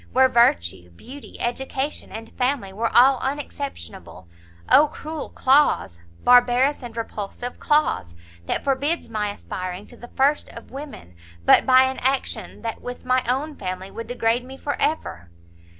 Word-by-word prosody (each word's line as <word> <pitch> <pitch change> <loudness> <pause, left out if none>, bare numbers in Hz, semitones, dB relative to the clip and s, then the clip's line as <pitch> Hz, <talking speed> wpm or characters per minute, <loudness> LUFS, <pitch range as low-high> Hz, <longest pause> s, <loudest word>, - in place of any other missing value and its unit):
where 260 +1 +6
virtue, 90 - +2
beauty, 255 - -12
education 265 +4 -3
and 225 0 -8
family 250 -6 -1
were 225 +3 -1
all 260 +1 +5
unexceptionable, 95 - -6 0.4
Oh 300 +2 +6
cruel 310 +1 -7
clause! 260 - +2 0.2
barbarous 245 +3 +4
and 235 -2 -9
repulsive 230 +2 -5
clause! 295 - +1 0.3
that - - -1
forbids 285 +4 0
my 210 -2 -2
aspiring 185 -1 -6
to - - -15
the 240 - -11
first 280 +3 +2
of 230 - -11
women, 265 - -9 0.3
but - - +6
by 260 0 +7
an 260 0 -1
action 265 -1 -2
that 225 -1 -4
with 245 0 -8
my 255 0 +2
own 290 +4 -1
family 185 -1 -6
would 230 - -7
degrade 240 0 0
me 265 +1 -10
for 285 - -3
ever!" 85 - -2
245 Hz, 150 wpm, -23 LUFS, 205-270 Hz, 0.4 s, by